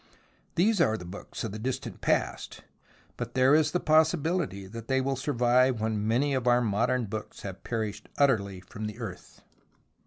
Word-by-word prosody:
They 205 Hz, +7 st, +4 dB
are 110 Hz, 0 st, +1 dB
the 90 Hz, -, -9 dB
books 90 Hz, +4 st, -7 dB
of 110 Hz, -, -3 dB
the 110 Hz, -, -6 dB
distant 130 Hz, +3 st, -4 dB
past, -, -, -1 dB, 0.5 s
but -, -, -5 dB
there 130 Hz, +2 st, +5 dB
is 155 Hz, 0 st, +4 dB
the 180 Hz, -, 0 dB
possi 160 Hz, +1 st, +4 dB
bility 145 Hz, -, -2 dB
that 115 Hz, 0 st, -8 dB
they 130 Hz, 0 st, +2 dB
will 135 Hz, +1 st, 0 dB
survive 125 Hz, -2 st, +2 dB
when 110 Hz, -1 st, -1 dB
many 135 Hz, +6 st, +2 dB
of 130 Hz, -2 st, -1 dB
our 120 Hz, 0 st, +5 dB
modern 115 Hz, +3 st, +1 dB
books 110 Hz, +1 st, -7 dB
have 95 Hz, -2 st, -7 dB
perished 110 Hz, -3 st, -4 dB
utterly 100 Hz, -9 st, +2 dB
from 105 Hz, +3 st, -7 dB
the 105 Hz, -, -7 dB
earth. -, -, -8 dB
120 Hz, 180 wpm, -28 LUFS, 105-135 Hz, 0.5 s, there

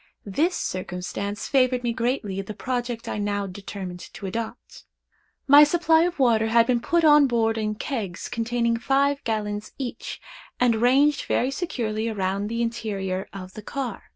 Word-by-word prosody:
This 310 Hz, -, +1 dB
circumstance 185 Hz, +3 st, -4 dB
favored 255 Hz, -2 st, +2 dB
me 235 Hz, -1 st, 0 dB
greatly 230 Hz, -5 st, -1 dB
in 195 Hz, -, -4 dB
the 215 Hz, -, -6 dB
project 240 Hz, 0 st, -3 dB
I -, -, -3 dB
now 205 Hz, -1 st, -1 dB
determined 190 Hz, -1 st, -7 dB, 0.2 s
to 200 Hz, -, -7 dB
adopt. 225 Hz, +5 st, -6 dB, 0.6 s
My 285 Hz, +1 st, +9 dB
supply 325 Hz, +1 st, +4 dB
of 355 Hz, 0 st, -2 dB
water 230 Hz, -5 st, +3 dB
had 230 Hz, +1 st, +5 dB
been 245 Hz, 0 st, +2 dB
put 335 Hz, +7 st, +1 dB
on 295 Hz, -2 st, +7 dB
board 225 Hz, -2 st, +1 dB
in 215 Hz, -1 st, -2 dB
kegs 210 Hz, -, -4 dB
containing 235 Hz, 0 st, 0 dB
five 280 Hz, +3 st, +1 dB
gallons 210 Hz, -2 st, -3 dB
each, 255 Hz, -3 st, -5 dB, 0.4 s
and 240 Hz, -2 st, +3 dB
ranged 275 Hz, +4 st, +4 dB
very 255 Hz, -, +1 dB
securely 230 Hz, -9 st, -2 dB
around 200 Hz, -1 st, -1 dB
the 230 Hz, +2 st, -1 dB
interior 200 Hz, -5 st, -3 dB
of 185 Hz, -1 st, -9 dB
the 215 Hz, -, -8 dB
car. 250 Hz, 0 st, -5 dB
230 Hz, 160 wpm, -24 LUFS, 205-260 Hz, 0.6 s, My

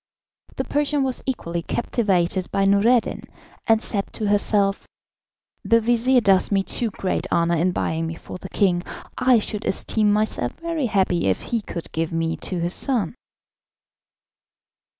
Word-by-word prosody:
The -, -, -2 dB
Persian 290 Hz, -1 st, 0 dB
was 260 Hz, -2 st, -2 dB
equally 170 Hz, -10 st, -2 dB
captivated 185 Hz, -3 st, -1 dB
by 195 Hz, -, +1 dB
Noureddin, 215 Hz, +5 st, +3 dB, 0.5 s
and 225 Hz, 0 st, +3 dB
said 200 Hz, -3 st, -2 dB
to 210 Hz, -2 st, -2 dB
herself: 205 Hz, -1 st, +2 dB, 0.8 s
"The 230 Hz, +3 st, +4 dB
vizir 240 Hz, +2 st, +3 dB
does 195 Hz, -3 st, +3 dB
me 195 Hz, -1 st, +2 dB
too 230 Hz, +3 st, -1 dB
great 190 Hz, -2 st, -3 dB
honour 170 Hz, 0 st, +2 dB
in 180 Hz, +3 st, +2 dB
buying 165 Hz, -2 st, -2 dB
me 165 Hz, -, -5 dB
for 180 Hz, -, -9 dB
the 190 Hz, -, -9 dB
king. 180 Hz, -3 st, +1 dB, 0.3 s
I 255 Hz, -1 st, +4 dB
should 210 Hz, -1 st, -3 dB
esteem 210 Hz, +2 st, +1 dB
myself 215 Hz, +1 st, 0 dB
very 330 Hz, -5 st, -2 dB
happy 190 Hz, -, +1 dB
if 95 Hz, -, 0 dB
he 230 Hz, -2 st, -2 dB
would 170 Hz, -, -5 dB
give 165 Hz, 0 st, -2 dB
me 165 Hz, 0 st, -1 dB
to 185 Hz, -, -4 dB
his 170 Hz, +1 st, 0 dB
son." 235 Hz, -10 st, 0 dB
200 Hz, 150 wpm, -22 LUFS, 175-235 Hz, 0.8 s, The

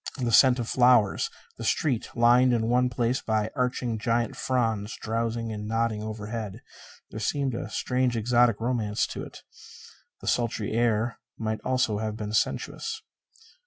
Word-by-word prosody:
The 120 Hz, -3 st, -1 dB
scent 130 Hz, +2 st, +6 dB
of 120 Hz, -, -2 dB
the -, -, -5 dB
flowers, 120 Hz, -5 st, +4 dB, 0.3 s
the -, -, -7 dB
street 130 Hz, -8 st, 0 dB
lined 120 Hz, +2 st, +5 dB
in 115 Hz, -1 st, +1 dB
one 125 Hz, +1 st, +3 dB
place 120 Hz, +1 st, 0 dB
by 110 Hz, 0 st, -1 dB
arching 125 Hz, -2 st, -1 dB
giant 115 Hz, +1 st, 0 dB
fronds 115 Hz, -4 st, -1 dB
drowsing 115 Hz, 0 st, -2 dB
and 105 Hz, 0 st, -5 dB
nodding 115 Hz, -1 st, 0 dB
overhead 110 Hz, -1 st, -5 dB, 0.5 s
there 110 Hz, -, -6 dB
seemed 135 Hz, +4 st, -1 dB
a 115 Hz, -, -4 dB
strange 125 Hz, +2 st, 0 dB
exotic 120 Hz, 0 st, +3 dB
romance 115 Hz, -3 st, 0 dB
to -, -, -6 dB
it. -, -, -10 dB, 0.8 s
The -, -, -10 dB
sultry 115 Hz, -3 st, 0 dB
air 115 Hz, 0 st, +1 dB, 0.2 s
might 110 Hz, -1 st, -3 dB
almost 130 Hz, 0 st, +2 dB, 0.2 s
have 110 Hz, -1 st, -3 dB
been 105 Hz, -1 st, -5 dB
sensuous. 445 Hz, -, -1 dB
115 Hz, 155 wpm, -27 LUFS, 110-125 Hz, 0.8 s, scent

